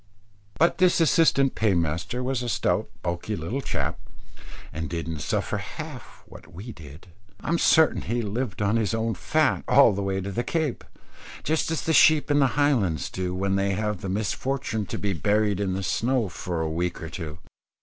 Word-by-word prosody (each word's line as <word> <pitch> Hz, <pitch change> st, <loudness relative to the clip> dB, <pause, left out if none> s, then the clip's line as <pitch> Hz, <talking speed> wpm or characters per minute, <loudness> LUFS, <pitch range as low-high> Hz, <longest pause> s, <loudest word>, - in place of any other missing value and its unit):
But 170 Hz, +3 st, +3 dB
this 185 Hz, -2 st, +4 dB
assistant 155 Hz, -4 st, +4 dB
paymaster 90 Hz, +3 st, 0 dB
was 130 Hz, -1 st, -1 dB
a 120 Hz, -, -3 dB
stout -, -, 0 dB
bulky 85 Hz, +5 st, -2 dB
little 100 Hz, +11 st, -3 dB
chap, -, -, -2 dB, 0.7 s
and 80 Hz, +1 st, -4 dB
didn't 85 Hz, -2 st, -4 dB
suffer -, -, -1 dB
half -, -, -9 dB
what 85 Hz, -, -14 dB
we 100 Hz, +8 st, -8 dB
did. 80 Hz, 0 st, -13 dB, 0.3 s
I'm 170 Hz, +1 st, 0 dB
certain 160 Hz, -1 st, +4 dB
he 120 Hz, +1 st, -2 dB
lived 105 Hz, 0 st, -3 dB
on 105 Hz, +3 st, +2 dB
his 110 Hz, -3 st, 0 dB
own 115 Hz, 0 st, 0 dB
fat 155 Hz, +3 st, +1 dB
all 140 Hz, -6 st, +6 dB
the 100 Hz, -, -2 dB
way 95 Hz, -1 st, -1 dB
to 95 Hz, +1 st, -4 dB
the 120 Hz, +5 st, -1 dB
Cape, 160 Hz, -4 st, -2 dB, 0.6 s
just 160 Hz, +1 st, 0 dB
as 160 Hz, -, -2 dB
the 160 Hz, -, +1 dB
sheep 155 Hz, -1 st, +5 dB
in 145 Hz, -, +4 dB
the 135 Hz, -, +5 dB
Highlands 115 Hz, -, +1 dB
do, 90 Hz, -1 st, -3 dB
when 95 Hz, +1 st, 0 dB
they 100 Hz, 0 st, +1 dB
have 105 Hz, -1 st, -2 dB
the 100 Hz, -, -4 dB
misfortune 110 Hz, +2 st, -2 dB
to -, -, -4 dB
be 100 Hz, -1 st, -1 dB
buried 105 Hz, +1 st, +1 dB
in 95 Hz, -2 st, 0 dB
the 95 Hz, +1 st, -3 dB
snow 120 Hz, +2 st, 0 dB
for 85 Hz, -1 st, -4 dB
a 80 Hz, -, -1 dB
week 85 Hz, +2 st, -2 dB
or 80 Hz, -, -6 dB
two. 80 Hz, -4 st, -6 dB
105 Hz, 185 wpm, -25 LUFS, 90-130 Hz, 0.7 s, all